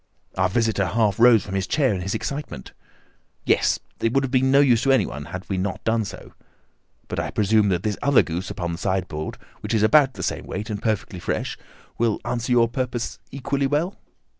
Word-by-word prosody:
Our 95 0 +2
visitor 110 -2 +1
half 105 +2 +1
rose 120 -2 +6
from 95 - -7
his 95 0 -1
chair 140 -7 +2
in 95 - -3
his 95 +2 -2
excitement. 140 - -5 0.7
"Yes, - - +3 0.2
it 115 - +1
would 135 - +2
have 130 - -3
been 130 0 +3
of - - +2
no 140 - +7
use 125 -5 +4
to 135 - +3
anyone 75 - 0
had 90 +5 -7
we 95 -2 -2
not 95 0 -3
done 110 -1 +1
so. - - -10 0.7
But - - -4
I - - -2
presume 105 0 +2
that 90 -1 0
this 105 -2 -2
other 140 -1 +5
goose 85 +3 -4
upon 85 -1 -3
the 85 - -5
sideboard, 90 -5 -2 0.2
which - - -2
is 105 - +2
about 135 +3 +5
the - - -6
same - - -3
weight 105 +2 -5
and 105 - -4
perfectly 105 -4 -2
fresh, - - -3 0.4
will 115 -2 +1
answer 120 +1 -2
your 120 -1 +5
purpose 125 0 -3
equally 140 +1 -1
well?" 155 +7 0
110 Hz, 210 wpm, -23 LUFS, 95-130 Hz, 0.7 s, no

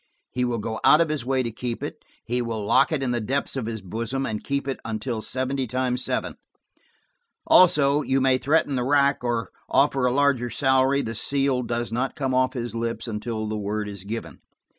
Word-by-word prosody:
He 125 0 0
will 120 -1 -1
go 110 +1 -4
out 150 - +7
of 165 -1 +2
his 150 -5 -2
way 130 +1 0
to 115 - -3
keep 115 +1 -5
it: - - -6 0.2
he 125 +2 -1
will 115 -3 -3
lock - - +4
it 150 -4 0
in 125 - 0
the 120 -1 -1
depths 135 +7 -1
of 125 -5 -3
his 110 -3 -5
bosom, 115 +8 -3
and 105 -1 -4
keep 140 0 -2
it 135 - -3
until 110 +1 -3
seventy 130 +3 -2
times 125 +1 -1
seven. - - -2 1.1
Also, 150 -5 +5
you 135 -2 +1
may 130 -1 +3
threaten 145 0 +1
the 125 - 0
rack 140 0 +2
or 120 -1 -2 0.2
offer 135 -2 +3
a - - +1
larger 135 -2 +2
salary, 130 +2 +2
the 115 - -4
seal 135 +2 0
does 120 -1 -3
not 125 +3 -2
come 135 -3 -2
off 130 0 +2
his 120 -4 -4
lips 115 +1 -3
until 110 0 -4
the 110 - -3
word 105 +1 -3
is 100 -2 -7
given. 110 +3 -6
125 Hz, 205 wpm, -24 LUFS, 115-135 Hz, 1.1 s, out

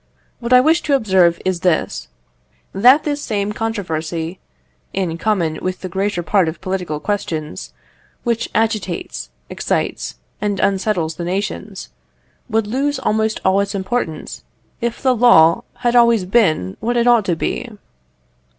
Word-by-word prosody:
What 235 0 -5
I 250 0 +8
wish 320 +5 +3
to 285 - +2
observe 190 -8 +3
is 185 -2 0
this, 175 -2 0 0.7
that 250 +9 +6
this 290 -1 -2
same 210 -4 -2
controversy 170 -6 -3 0.5
(in 185 -4 -1
common 175 -7 0
with 185 0 -3
the 185 - -5
greater 190 0 -1
part 185 -2 +2
of 160 - -8
political 185 -5 -3
questions) 160 -5 -4 0.5
which 235 -1 -1
agitates, 215 - -2 0.2
excites, - - -2 0.3
and 205 -2 -1
unsettles 190 -5 0
the 175 - -4
nations, 195 +2 -4 0.6
would 225 -1 +1
lose 275 +6 -1
almost 220 -3 0
all 190 +1 +4
its 200 0 -1
importance 190 -5 -3 0.4
if 235 +2 -3
the 260 -2 +3
law 190 -9 +5 0.2
had 240 0 +3
always 235 -5 +5
been 165 - +1
what 240 +2 -1
it 235 - +2
ought 240 -4 +4
to 175 - +1
be. 240 +8 -3
200 Hz, 140 wpm, -19 LUFS, 175-235 Hz, 0.7 s, I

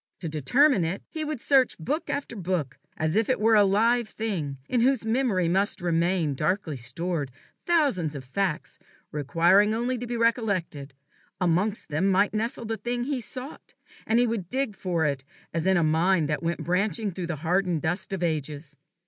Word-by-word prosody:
To 170 - -3
determine 190 - +3
it, 165 +4 -3
he 315 - -4
would 305 -3 -3
search 265 0 +3
book 290 - -3
after 280 -4 -3
book, 175 - -3 0.2
as 155 +2 0
if 220 +2 +2
it 255 - +1
were 225 +1 +4
a 210 -1 +7
live 225 +4 +2
thing, 175 -11 -3
in 245 - +1
whose 260 -1 +2
memory 225 -7 +1
must 195 +5 +1
remain, 170 -2 +1
darkly 155 +2 -1
stored, 140 +5 -3 0.4
thousands 265 - +2
of 135 - -6
facts, 170 +5 -3 0.3
requiring 175 +8 +3
only 240 +2 -1
to 245 - -5
be 240 0 -3
recollected: 200 - -1 0.4
amongst 185 +5 0
them 155 +6 +1
might 195 +2 +3
nestle 230 +2 -2
the 225 0 -3
thing 240 +1 -2
he 265 -1 -2
sought, 255 +5 -8 0.3
and 225 - +3
he 245 - +4
would 220 -7 -3
dig 260 -5 -1
for 175 -4 -1
it 140 -3 -1 0.3
as 165 +2 -1
in 190 -1 +4
a 170 - +3
mine 165 +2 +2
that 150 -1 -2
went 170 +1 -2
branching 195 +3 0
through 175 -1 -5
the 170 - -2
hardened 180 -2 +1
dust 175 +4 -2
of 190 -2 -2
ages. 150 -2 -3
190 Hz, 180 wpm, -26 LUFS, 160-230 Hz, 0.4 s, a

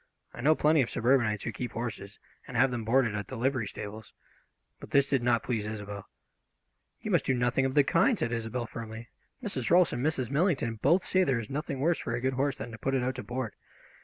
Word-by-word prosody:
I - - -8
know 155 +5 +5
plenty 155 0 +4
of 120 - -1
suburbanites 120 -4 +2
who 115 - -2
keep 120 0 -5
horses 110 -4 -5 0.3
and - - -4
have 135 - +4
them 120 -2 -3
boarded 120 -1 +2
at 105 -1 -4
the 130 - -6
livery 130 -2 0
stables. 105 +2 -8 0.7
But - - -10
this 140 -1 +4
did 135 -2 +1
not 120 -1 +2
please 110 -4 -2
Isobel. 105 -2 -6 0.9
"You - - -4
must - - +3
do 130 - +3
nothing 125 +2 +1
of 130 - -1
the 145 - +6
kind!" 245 - +3
said 115 - -1
Isobel 115 +1 -2
firmly. 115 0 -8 0.3
"Mrs. 140 - -2
Rolfs 175 0 +5
and 120 - -2
Mrs. 135 -5 0
Millington 140 - +1
both 170 +7 +3
say 185 0 +3
there 135 -8 +1
is 110 +1 -7
nothing 140 -1 -3
worse 165 +3 +2
for 115 - -3
a - - -2
good 130 +1 0
horse 135 +1 0
than 115 +2 -7
to 115 - -9
put 135 0 0
it 130 - +1
out 130 +1 0
to 125 - -6
board. 125 -2 -4
125 Hz, 230 wpm, -29 LUFS, 115-135 Hz, 0.9 s, the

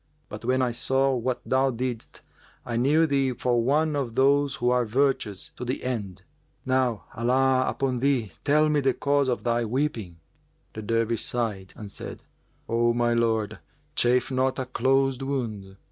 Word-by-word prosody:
But, - - -8
when 130 +2 +1
I 125 - +1
saw 135 +3 +1
what 125 0 -2
thou 130 +1 +2
didst, 125 -1 -5 0.4
I 120 - -3
knew 145 +7 +3
thee 135 -3 +1
for 120 0 +1
one 150 +4 +2
of 125 -5 -3
those 140 +1 +3
who 120 +1 +1
are 125 0 +3
virtuous 120 -4 0
to - - -5
the 125 +2 -3
end. 105 -8 -4 0.4
Now 130 -4 +1
Allah 130 +2 +2
upon 130 -2 -1
thee, 130 -6 +1
tell 150 +2 +4
me 150 -1 +2
the 135 -2 +1
cause 140 +1 +1
of 125 - -1
thy 120 0 +1
weeping!" 115 - -2 0.5
The 110 - -6
Dervish 115 +1 0
sighed 105 -6 -3
and 105 -2 -8
said, - - -8 0.4
"O 120 +1 +2
my 120 0 +2
lord, 110 -2 0 0.4
chafe 125 +2 +2
not 130 0 +1
a 130 - -2
closed[FN#394] 135 +1 +1
wound." 110 -8 -4
125 Hz, 165 wpm, -26 LUFS, 115-135 Hz, 0.5 s, tell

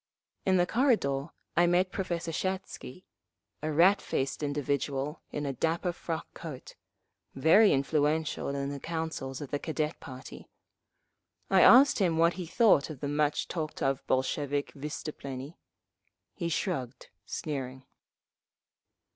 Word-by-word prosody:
In 190 -1 +4
the 175 - +4
corridor 180 - +1 0.3
I 175 +1 +5
met 180 +2 +2
Professor 170 -4 -3
Shatsky, 185 -3 -4 0.6
a 155 +1 -2
rat 180 +6 +5
faced 135 +3 -2
individual 145 0 -2
in 150 - -3
a 140 - -2
dapper 165 +6 0
frock 165 -2 -4
coat, 150 -6 -8 0.6
very 165 +10 +6
influential 150 +3 +1
in 140 0 -2
the 140 0 -5
councils 160 -5 -4
of 145 - -7
the 145 - -1
Cadet 155 0 -2
party. 130 -3 -10 1.0
I 190 -1 +6
asked 265 +1 +7
him 175 -5 +2
what 170 +1 +4
he 180 -2 -6
thought 180 - +4
of 150 -4 -7
the 145 - -2
much 145 0 0
talked 155 -3 -4
of 135 0 0
Bolshevik 140 +2 0
vystuplennie. 140 0 -6 0.8
He 170 -3 -3
shrugged, 135 -7 -3 0.2
sneering. 130 -3 -5
155 Hz, 130 wpm, -29 LUFS, 140-175 Hz, 1.0 s, asked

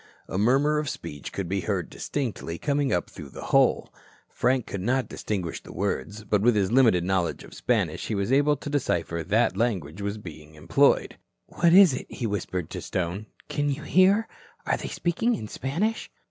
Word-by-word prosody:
A 95 - -3
murmur 140 +7 +3
of 150 -2 -2
speech 75 -4 -7
could 100 -3 -4
be 95 +2 -1
heard 95 -6 -2
distinctly, 115 - -4
coming 140 - 0
up 90 - 0
through 75 - -10
the - - -9
hole. - - +3 0.4
Frank 130 -2 +1
could 100 - -5
not 130 +5 0
distinguish 95 -6 -4
the - - -12
words, 100 +1 -3
but 105 -1 +1
with 120 +1 +4
his 100 -1 +1
limited 115 -9 +4
knowledge 90 -1 -1
of - - -13
Spanish - - -1
he 110 - -1
was 100 +3 -1
able 145 +2 +4
to 145 - -7
decipher 85 - -1
that 105 +1 +2
language 95 -6 -1
was 100 +1 -3
being 80 -6 -11
employed. 80 +2 +2 0.3
"What 170 -1 +2
is 185 -4 +8
it?" - - -5
he 120 - -5
whispered 95 -5 -3
to - - -5
Stone. 95 +4 -3 0.2
"Can 145 0 -1
you 145 +2 -3
hear? 195 +7 +4 0.4
Are - - +2
they - - -6
speaking 225 +8 0
in 110 - -6
Spanish?" 175 - -2
105 Hz, 190 wpm, -26 LUFS, 90-140 Hz, 0.4 s, is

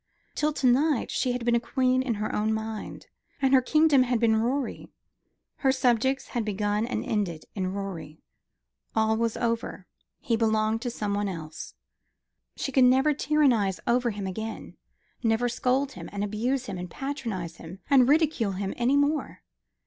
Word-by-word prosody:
Till 300 0 0
to 275 - -2
night 270 +2 +3
she 255 - 0
had 245 -1 -4
been 240 - +2
a 235 - +4
queen 255 +1 +1
in 250 -3 -1
her 210 +1 -3
own 215 +1 0
mind; 220 -1 -6 0.3
and 270 -1 +2
her 260 - +7
kingdom 305 +1 +4
had 245 -2 +1
been 225 -1 +3
Rorie, 245 +4 -2 0.7
her 270 - +2
subjects 260 0 +1
had 240 -3 -2
begun 210 +1 -1
and 250 - -3
ended 185 -8 -2
in 185 -2 -2
Rorie. 180 -6 -6 0.7
All 220 0 +2
was 230 0 -1
over. 230 -5 -2 0.3
He 230 - 0
belonged 220 0 +1
to 245 - -2
some 210 -3 -3
one 205 0 0
else. 160 -4 -7 0.8
She 270 - -3
could 260 -1 +5
never 265 +4 +4
tyrannise 265 -11 +2
over 245 0 +2
him 205 -3 -5
again 220 +4 -6 0.5
never 225 +1 +1
scold 260 +3 0
him - - -9
and 205 0 -3
abuse 240 +6 -1
him 195 -6 -5
and 180 0 -6
patronise 215 - -5
him 165 +3 -10
and 260 -2 +5
ridicule 295 -9 +2
him 195 +1 -3
any 250 +4 +2
more. 290 +2 0
230 Hz, 170 wpm, -27 LUFS, 205-260 Hz, 0.8 s, her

